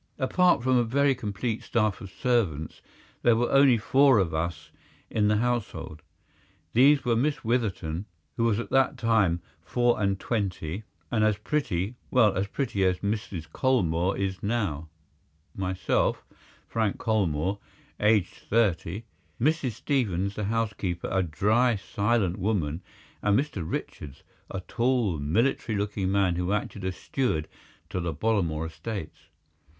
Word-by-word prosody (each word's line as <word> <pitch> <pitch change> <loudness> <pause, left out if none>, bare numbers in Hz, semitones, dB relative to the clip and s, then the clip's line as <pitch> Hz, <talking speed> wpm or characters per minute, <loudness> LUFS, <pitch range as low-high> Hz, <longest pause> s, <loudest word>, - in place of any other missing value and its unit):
Apart 175 +1 +3
from 130 0 +3
a 120 - +4
very 140 +4 +2
complete 110 -1 -3
staff 110 -4 0
of 95 - -8
servants 95 - -1 0.4
there 120 - +5
were 120 +1 0
only 135 -3 +6
four 130 +4 +4
of 90 -5 +1
us 80 0 -3 0.4
in 105 -1 +2
the 105 0 +3
household. 105 -10 -2 0.7
These 135 +4 +5
were 120 -1 +2
Miss 140 +6 0
Witherton, 100 -7 -1 0.3
who 115 - +1
was 110 -3 +2
at 120 - -5
that 135 +1 +3
time 110 -8 +2 0.2
four 120 -2 +1
and 100 -1 +1
twenty 100 -4 -3 0.3
and 110 -2 +2
as 110 -2 +3
pretty—well, 110 - 0
as 95 +2 0
pretty 110 -4 -1
as 90 -1 +2
Mrs. 100 -5 -3
Colmore 95 - +1
is 95 -1 -2
now—myself, 80 -2 -3 0.4
Frank 110 -3 0
Colmore, 95 -3 0 0.4
aged 105 -3 +3 0.2
thirty, 100 -2 +1 0.4
Mrs. 140 -1 +1
Stevens, 100 - -1
the 105 0 -3
housekeeper, 105 -5 -2
a 95 - +2
dry, 110 +8 +2
silent 100 -1 0
woman, 90 -6 -1 0.4
and 105 0 +3
Mr. 140 -9 -3
Richards, 75 -3 -6 0.3
a 95 - -4
tall 115 - 0
military 110 - 0
looking 100 -2 -1
man, 95 -3 +2
who 90 +2 0
acted 105 -1 -3
as 95 -1 -2
steward 90 - -1 0.4
to - - -2
the 85 -3 -3
Bollamore 85 -6 0
estates. 85 +1 -7
105 Hz, 135 wpm, -27 LUFS, 90-120 Hz, 0.7 s, only